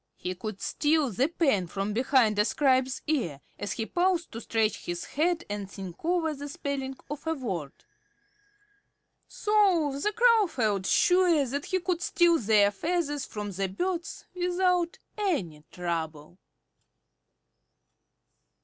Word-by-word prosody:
He 180 - -4
could 210 +1 -6
steal 300 -3 +1
the 250 +8 +1
pen 275 - +1
from 195 +4 -3
behind 235 -3 +3
a - - +6
scribe's 260 0 +1
ear, 235 - -1 0.2
as 205 - -3
he 225 - -3
paused 350 +3 0
to 230 - -6
scratch 220 -1 0
his 175 0 -3
head 340 +3 0
and 205 -1 -5
think 190 -4 -9
over 335 -2 +1
the 285 0 -7
spelling 270 -1 -4
of 295 +2 -7
a 320 - +1
word. 185 - -4 1.6
So 385 -9 +2
the 420 - +1
Crow 460 -2 +4
felt 210 - -1
sure 355 -5 +4
that 280 +3 -3
he 375 - 0
could 355 -1 -2
steal 345 -1 +3
their 210 -2 +4
feathers 295 - -1
from 210 -1 -5
the 195 +1 -2
birds 345 - -3
without 360 -1 +1 0.2
any 195 - -1
trouble. 165 -1 -4
275 Hz, 135 wpm, -28 LUFS, 205-345 Hz, 1.6 s, a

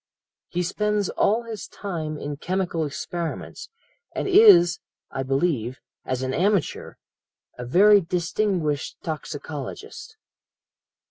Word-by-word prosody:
"'He 180 +1 -2
spends 210 +2 0
all 225 +4 +1
his 225 -3 -7
time 160 -6 -5
in 145 0 -5
chemical 175 -1 -1
experiments, 165 +3 -5 0.5
and - - -2
is, 175 - +7 0.3
I 135 - -3
believe, 135 -3 -1 0.3
as 130 0 -2
an 130 0 -2
amateur, 195 -1 0 0.6
a 125 - -4
very 200 +8 +6
distinguished 175 -3 -1
toxicologist.'" 160 - -6
175 Hz, 105 wpm, -24 LUFS, 150-205 Hz, 0.6 s, is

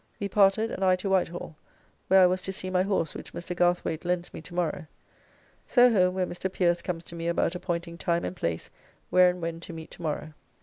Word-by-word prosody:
We 200 - -1
parted, 200 +3 +3
and 195 - -3
I 185 -1 +5
to 190 +2 -3
Whitehall, 175 -3 -1 0.5
where 190 0 +6
I - - +8
was 185 +1 +1
to 190 - -4
see 185 -1 -5
my 180 0 +3
horse 190 -5 0
which - - -9
Mr. 175 +1 -5
Garthwayt 175 -2 +1
lends 175 0 -2
me - - -7
to 175 +2 -10
morrow. 175 -1 -2 0.8
So 245 -1 +5
home, 180 -2 +3
where 185 -1 +1
Mr. 180 +1 -4
Pierce 175 -2 +1
comes 170 -2 -4
to 170 - -9
me 165 0 -4
about 170 - +1
appointing 170 -2 -4
time 170 0 0
and - - -4
place 85 - -3 0.4
where 180 0 +6
and 180 -1 -4
when 165 0 -3
to 170 - -9
meet 160 -1 -9
tomorrow. 155 -2 -4
180 Hz, 220 wpm, -27 LUFS, 170-185 Hz, 0.8 s, I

